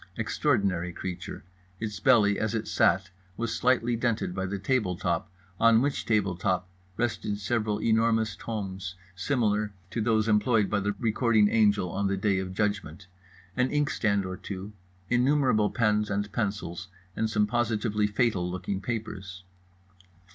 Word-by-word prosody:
Extraordinary 90 -3 0
creature. 90 0 -6 0.4
Its 105 -2 -4
belly, 110 -5 +4
as 110 +1 -1
it 110 -1 -2
sat, - - +2 0.3
was 115 0 -2
slightly 120 -1 +2
dented 115 -5 -1
by 95 0 -2
the 100 +2 -3
table 100 -2 0
top, 85 +2 -2 0.3
on 115 -1 +6
which 140 +3 -1
table 105 -5 +2
top 90 0 -1 0.3
rested 115 -3 -1
several 105 0 -1
enormous 110 -1 +2
tomes 95 -5 -5 0.2
similar 105 -1 0 0.2
to 115 - -2
those 110 0 +2
employed 105 -1 +3
by 105 - +2
the 100 +1 -1
recording 110 -1 +3
angel 105 -5 +3
on 100 +2 0
the 100 0 0
Day 95 -1 +1
of 95 -1 -4
Judgment, 100 -4 -2 0.5
an 125 +1 +2
inkstand 110 -9 +1
or 95 0 -5
two, 100 +1 -7 0.3
innumerable 125 -4 +3
pens 105 -2 +1
and 100 0 -2
pencils, 100 -5 -3 0.3
and 110 - 0
some 105 -1 +2
positively 105 -2 0
fatal 105 -4 +1
looking 95 +2 -3
papers. 100 -5 -5
105 Hz, 145 wpm, -28 LUFS, 95-115 Hz, 0.5 s, on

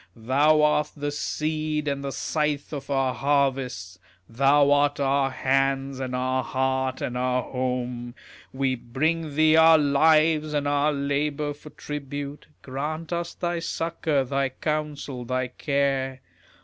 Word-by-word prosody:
Thou 145 +6 +3
art 150 0 +2
the 145 0 -2
Seed 155 0 -2
and 140 -1 -2
the 140 - -3
Scythe 150 0 -2
of 140 -1 -6
our 135 -2 +1
harvests, 135 -10 -1 0.3
Thou 140 +4 +3
art 145 0 +3
our 135 0 +2
Hands 135 0 0
and 130 -1 -3
our 130 0 0
Heart 130 0 -1
and 125 - -3
our 125 0 0
Home. 125 -1 -3 0.4
We 130 0 0
bring 150 +6 -2
thee 155 +1 +5
our 160 0 +7
lives 155 +1 +3
and 145 -1 0
our 145 +1 +2
labours 145 +1 -2
for 150 - -11
tribute, 145 0 -6 0.2
Grant 155 +5 -4
us 170 0 -3
thy 175 -1 -2
succour, 165 -4 -1
thy 135 +1 -1
counsel, 145 -2 -3
thy 130 +1 -2
care. 135 -1 -1
140 Hz, 135 wpm, -25 LUFS, 130-150 Hz, 0.4 s, our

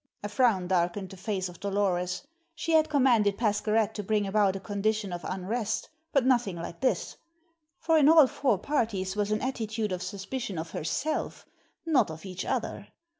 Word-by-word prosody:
A 205 - -3
frown 205 -5 +2
darkened 180 +1 0
the - - -9
face 190 0 -2
of 175 -1 -12
Dolores; 190 0 -1 0.3
she 330 - -3
had 315 -1 +4
commanded 240 -8 +3
Pascherette 215 0 +1
to 215 - -4
bring 210 +1 +1
about 195 -1 +2
a - - -3
condition 205 0 -1
of 175 - -5
unrest, 210 +4 -2 0.2
but 275 -3 +2
nothing 240 -8 +2
like 170 0 -7
this; 260 - 0 0.6
for 325 -1 +3
in 290 0 +6
all 320 -2 +8
four 255 -4 +1
parties 205 -6 -1
was 205 -1 0
an 215 0 0
attitude 220 -4 -2
of 180 -1 -3
suspicion 195 +2 -5
of 160 +1 -5
herself, 300 - -2 0.4
not 270 - +3
of 160 +3 -8
each 185 -1 -5
other. - - -3
205 Hz, 175 wpm, -28 LUFS, 190-240 Hz, 0.6 s, all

